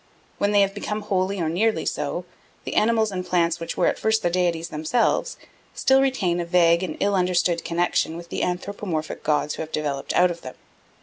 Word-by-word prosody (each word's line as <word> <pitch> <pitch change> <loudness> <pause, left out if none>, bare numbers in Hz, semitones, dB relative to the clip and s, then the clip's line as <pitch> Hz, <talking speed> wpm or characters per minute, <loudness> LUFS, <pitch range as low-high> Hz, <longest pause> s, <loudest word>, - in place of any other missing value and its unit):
When 205 - +2
they 205 -1 +5
have 195 0 +2
become 210 +1 -4
wholly 195 -1 -1
or 165 - 0
nearly 215 +8 +1
so, - - -2 0.4
the - - -5
animals 220 0 +2
and 185 -1 -3
plants 170 -2 +1
which 165 - -5
were - - +2
at - - +1
first 220 0 +1
the 175 - +1
deities 170 -2 0
themselves, 155 +10 0 0.4
still 265 0 +4
retain 210 -11 +1
a - - 0
vague 170 -1 +4
and 175 -5 -4
ill 200 0 +1
understood 180 -2 +1
connexion 170 -1 0
with 170 0 -10
the - - -3
anthropomorphic 180 -3 -3
gods 150 -1 0
who - - -5
have 160 0 -6
developed 145 -3 -2
out 180 0 +4
of 170 - -8
them. 130 - -9
180 Hz, 200 wpm, -24 LUFS, 170-200 Hz, 0.4 s, they